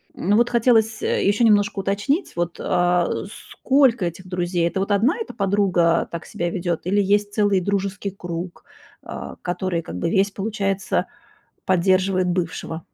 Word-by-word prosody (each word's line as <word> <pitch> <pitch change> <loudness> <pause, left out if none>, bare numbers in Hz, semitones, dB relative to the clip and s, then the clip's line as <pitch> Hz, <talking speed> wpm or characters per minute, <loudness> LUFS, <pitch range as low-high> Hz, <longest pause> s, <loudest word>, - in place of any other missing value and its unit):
Но 205 +4 +1
вот 240 0 +3
хотелось, 225 -2 +2
э, - - 0
ещё 205 +4 +2
немножко 205 -2 +3
уточнить, 205 - -1
вот, 175 0 -2
а 175 -1 +2 0.4
сколько 260 -7 +2
этих 180 +2 -6
друзей. 175 -1 -1
Это 170 +3 -3
вот 200 - -2
1 225 - +3
эта 450 - -5
подруга 190 -4 +2
так 170 -1 -6
себя 175 0 -3
ведёт 175 -2 -2
или 200 +3 +2
есть 205 +1 +1
целый 205 -3 +2
дружеский 200 +1 -2
круг, 175 -1 -6 0.4
а, - - -7
который 175 -1 -2
как 85 - -8
бы - - -1
весь, 195 +2 +2
получается, 195 -2 -1 0.6
поддерживает 185 0 +2
бывшего? 170 -2 -3
195 Hz, 155 wpm, -22 LUFS, 175-205 Hz, 0.6 s, вот